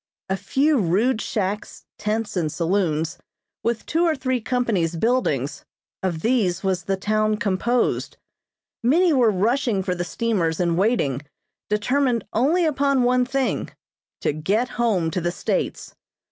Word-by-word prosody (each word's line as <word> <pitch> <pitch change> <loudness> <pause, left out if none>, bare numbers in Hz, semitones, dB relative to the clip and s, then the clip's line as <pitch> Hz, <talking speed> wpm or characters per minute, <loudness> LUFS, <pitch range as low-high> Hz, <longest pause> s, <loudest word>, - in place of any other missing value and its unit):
A 190 - +1
few 270 - +1
rude 215 +6 +2
shacks, 205 0 -3
tents 215 0 -2
and 160 -4 0
saloons, 165 -3 0 0.4
with 230 -1 -1
two 330 +1 +1
or 330 -2 +3
three 260 -2 -1
companies' 215 -9 0
buildings 165 - 0 0.4
of 175 -4 -2
these 205 -7 +1
was 185 -3 -1
the 195 -1 0
town 215 +2 +1
composed. 210 +5 0 0.6
Many 325 +8 +4
were 250 -5 +4
rushing 215 +1 +1
for 185 -1 -1
the 175 0 -2
steamers 180 -4 -1
in 170 -2 +1
waiting, 175 - +1 0.5
determined 245 +3 +1
only 310 +10 +3
upon 275 -3 +2
one 250 0 +3
thing 270 0 -1 0.5
to - - +1
get 200 +11 0
home 200 -9 0
to 180 - -2
the 175 +1 0
States. - - -2
215 Hz, 140 wpm, -23 LUFS, 180-250 Hz, 0.6 s, Many